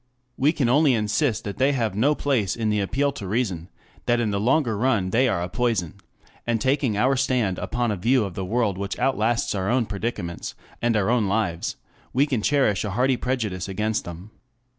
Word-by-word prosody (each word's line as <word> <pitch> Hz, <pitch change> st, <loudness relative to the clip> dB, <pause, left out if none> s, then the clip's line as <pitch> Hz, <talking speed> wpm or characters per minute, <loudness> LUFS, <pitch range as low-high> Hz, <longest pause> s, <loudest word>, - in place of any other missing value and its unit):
We 140 Hz, +5 st, +3 dB
can 140 Hz, -6 st, 0 dB
only 140 Hz, +1 st, +4 dB
insist 110 Hz, +3 st, 0 dB
that 100 Hz, -, -6 dB
they 135 Hz, +2 st, +3 dB
have 115 Hz, -6 st, 0 dB
no 140 Hz, +8 st, +3 dB
place 125 Hz, -11 st, 0 dB
in 110 Hz, -2 st, -1 dB
the 105 Hz, -, +1 dB
appeal 135 Hz, +9 st, 0 dB
to 100 Hz, -8 st, -7 dB
reason, 95 Hz, -6 st, -2 dB, 0.4 s
that 120 Hz, 0 st, +3 dB
in 110 Hz, -3 st, 0 dB
the 100 Hz, -, -1 dB
longer 125 Hz, +1 st, +2 dB
run 105 Hz, -5 st, +1 dB
they 130 Hz, +5 st, +3 dB
are 85 Hz, -7 st, 0 dB
a -, -, -2 dB
poison; 110 Hz, -4 st, -1 dB, 0.5 s
and 115 Hz, -1 st, +1 dB
taking 130 Hz, -3 st, +1 dB
our 130 Hz, +5 st, +3 dB
stand 125 Hz, -8 st, 0 dB
upon 120 Hz, -2 st, -1 dB
a -, -, 0 dB
view 115 Hz, +5 st, +2 dB
of 95 Hz, -, -6 dB
the 95 Hz, -, -4 dB
world 105 Hz, -1 st, 0 dB
which 100 Hz, 0 st, -3 dB
outlasts 120 Hz, -3 st, +1 dB
our 95 Hz, -1 st, -1 dB
own 125 Hz, -1 st, +2 dB
predicaments, 100 Hz, -4 st, -4 dB, 0.3 s
and 120 Hz, -1 st, +2 dB
our 105 Hz, +2 st, +1 dB
own 120 Hz, -4 st, +2 dB
lives, 95 Hz, -5 st, -1 dB, 0.4 s
we 135 Hz, +3 st, +4 dB
can 130 Hz, -7 st, -1 dB
cherish 130 Hz, -7 st, +2 dB
a 105 Hz, -, -2 dB
hearty 125 Hz, +6 st, +2 dB
prejudice 110 Hz, -8 st, -2 dB
against 105 Hz, +3 st, -1 dB
them. 85 Hz, +5 st, -9 dB
115 Hz, 205 wpm, -24 LUFS, 100-130 Hz, 0.5 s, only